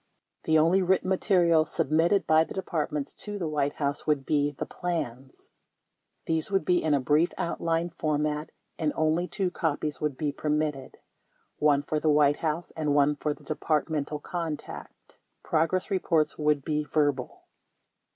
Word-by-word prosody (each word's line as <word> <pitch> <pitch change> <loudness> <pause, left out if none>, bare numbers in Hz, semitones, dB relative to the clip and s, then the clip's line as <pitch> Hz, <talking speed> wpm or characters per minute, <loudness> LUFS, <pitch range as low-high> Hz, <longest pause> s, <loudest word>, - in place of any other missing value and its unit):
The 160 - +4
only 165 +5 +4
written 185 0 +1
material 175 -4 +3
submitted 165 +3 +1
by 160 0 +5
the - - -9
Departments 150 -6 -3
to 205 -1 -6
the 175 -5 -2
White 145 -2 0
House 140 0 -3
would 145 -3 +1
be 145 -1 +2
the 145 - -5
plans. 135 -7 -5 0.7
These 160 -1 0
would 195 -5 0
be 180 +1 +3
in 155 -2 +3
a - - +2
brief 150 +6 +2
outline 170 0 -1
format 150 -1 -1 0.3
and 155 -2 0
only 160 +3 +1
two 185 -2 -1
copies 150 -3 -2
would 150 -3 -1
be 150 -2 -1
permitted 150 -2 -2 0.3
— - - -41 0.2
one 145 -2 +3
for 155 +1 -1
the 155 - +1
White 145 -1 +4
House 160 +1 -2
and 150 -3 -1
one 145 0 +4
for 150 +1 -2
the - - -20
Departmental 150 -1 -1
contact. 165 -2 -7 0.2
Progress 165 +5 0
re 190 - +2
ports 155 -4 +1
would 150 -2 +1
be 150 -1 0
verbal. 145 -3 -1
155 Hz, 160 wpm, -27 LUFS, 150-165 Hz, 0.7 s, by